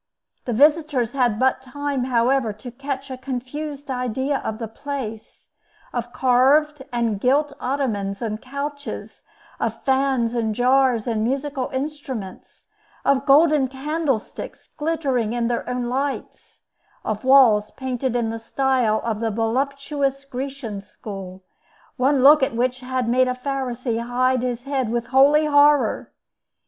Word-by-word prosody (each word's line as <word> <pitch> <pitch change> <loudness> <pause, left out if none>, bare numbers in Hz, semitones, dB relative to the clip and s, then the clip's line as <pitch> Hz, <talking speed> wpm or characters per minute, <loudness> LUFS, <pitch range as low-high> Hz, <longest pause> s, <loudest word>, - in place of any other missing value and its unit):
The 245 - -2
visitors 290 -2 +3
had 245 -5 +1
but 260 0 +2
time, 275 0 -3
however, 245 -1 +2
to 225 +4 -10
catch 275 +1 -5
a 260 - -5
confused 275 +2 -5
idea 260 +2 -1
of 220 - -4
the 225 -1 -5
place—of 240 -1 -8
carved 265 +4 +3
and 230 -4 0
gilt 280 +3 +2
ottomans 215 -8 -2
and 215 -2 -4
couches; 285 +2 -6 0.4
of - - -3
fans 265 -3 +1
and 225 -3 -1
jars 250 -2 +3
and 225 -2 -1
musical 270 +2 -2
instruments; 265 -8 -6 0.4
of 275 0 +2
golden 295 -1 +5
candlesticks 275 -2 -3
glittering 280 -8 -1
in 240 -1 0
their 240 - -2
own 250 -1 -2
lights; 270 +3 -4 0.4
of 215 +1 -2
walls 250 -6 +6
painted 260 -1 -3
in 230 -2 0
the 225 - -5
style 250 -2 +1
of 225 -2 -2
the 225 0 0
voluptuous 275 +5 -1
Grecian 260 -5 -5
school, 195 -2 -9 0.5
one 265 +1 +2
look 295 +2 +8
at 265 -2 0
which 250 +2 0
had 255 -1 -2
made 255 +2 +3
a 250 - -1
Pharisee 255 -3 -3
hide 250 +1 +1
his 245 -1 -3
head 270 -4 -1
with 235 +1 -1
holy 290 +3 +6
horror. 290 -1 +3
255 Hz, 135 wpm, -22 LUFS, 235-275 Hz, 0.5 s, look